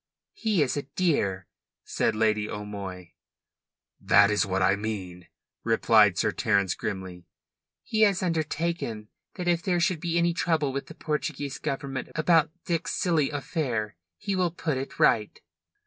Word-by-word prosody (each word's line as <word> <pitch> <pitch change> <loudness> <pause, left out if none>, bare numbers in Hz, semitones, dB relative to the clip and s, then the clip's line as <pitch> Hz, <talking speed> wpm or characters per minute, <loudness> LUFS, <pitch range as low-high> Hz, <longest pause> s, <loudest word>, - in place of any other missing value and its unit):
"He 210 -8 +1
is 130 - -1
a 145 - -1
dear," 135 - 0 0.4
said 110 - 0
Lady 110 -1 +1
O'Moy. 100 -4 -7 0.9
"That 100 - +5
is 105 -1 +1
what 95 0 0
I 95 +1 +4
mean," 95 -4 -5 0.4
replied - - +4
Sir - - +2
Terence 100 -4 +1
grimly. 95 -5 -6 0.6
"He 220 - -1
has 200 -3 +4
undertaken 160 -9 -2 0.3
that 180 -2 -4
if 170 -1 +2
there 180 -2 0
should 170 -1 +1
be 170 +1 -1
any 170 0 +2
trouble 160 -5 0
with 140 - -4
the - - -11
Portuguese 145 -2 -3
Government 135 -1 -4
about 160 0 +3 0.2
Dick's 170 -1 -1
silly 160 -6 +1
affair 130 - -2 0.2
he 195 - -3
will 180 -2 +2
put 160 -3 -3
it 135 +1 -5
right." 105 -2 +3
140 Hz, 150 wpm, -27 LUFS, 105-170 Hz, 0.9 s, That